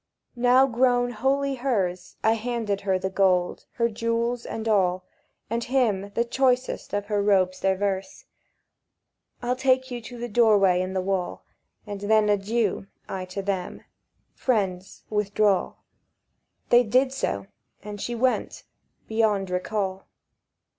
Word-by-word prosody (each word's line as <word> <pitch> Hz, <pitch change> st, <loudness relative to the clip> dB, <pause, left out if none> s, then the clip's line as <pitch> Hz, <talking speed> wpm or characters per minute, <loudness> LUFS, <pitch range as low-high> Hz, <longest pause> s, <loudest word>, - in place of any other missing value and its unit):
Now 250 Hz, +2 st, +5 dB
grown 245 Hz, -1 st, +2 dB
wholly 270 Hz, +4 st, 0 dB
hers, 210 Hz, -9 st, -2 dB
I 220 Hz, -, +4 dB
handed 225 Hz, -3 st, -2 dB
her 190 Hz, -2 st, +1 dB
the 190 Hz, +1 st, -3 dB
gold, 185 Hz, -2 st, +1 dB
her 235 Hz, -, +1 dB
jewels 230 Hz, +2 st, -2 dB
all, 190 Hz, -5 st, 0 dB, 0.4 s
And 230 Hz, +1 st, -2 dB
him 220 Hz, -7 st, +1 dB
the 235 Hz, -, +2 dB
choicest 255 Hz, +1 st, 0 dB
of 205 Hz, 0 st, -2 dB
her 205 Hz, -1 st, 0 dB
robes 190 Hz, -2 st, +2 dB
diverse. 195 Hz, 0 st, -1 dB, 1.2 s
"I'll 245 Hz, +1 st, 0 dB
take 260 Hz, 0 st, +1 dB
you 240 Hz, -1 st, -4 dB
to 245 Hz, +2 st, -10 dB
the 240 Hz, +1 st, -4 dB
doorway 205 Hz, -5 st, +4 dB
in 185 Hz, +1 st, -3 dB
the 190 Hz, -, 0 dB
wall, 190 Hz, -2 st, -2 dB, 0.4 s
And 205 Hz, -2 st, -6 dB
then 215 Hz, 0 st, +3 dB
adieu," 205 Hz, 0 st, 0 dB, 0.2 s
I 190 Hz, -1 st, -4 dB
to 185 Hz, +2 st, -5 dB
them. 190 Hz, -2 st, -3 dB, 0.5 s
"Friends, 195 Hz, -7 st, -2 dB
withdraw." 210 Hz, -2 st, +1 dB, 0.9 s
They 240 Hz, 0 st, +7 dB
did 255 Hz, +3 st, +2 dB
so; 100 Hz, -, -2 dB, 0.4 s
and 205 Hz, -1 st, -7 dB
she 240 Hz, -, -3 dB
went—beyond 220 Hz, -4 st, -2 dB
recall. 190 Hz, +1 st, -2 dB
210 Hz, 125 wpm, -25 LUFS, 195-240 Hz, 1.2 s, They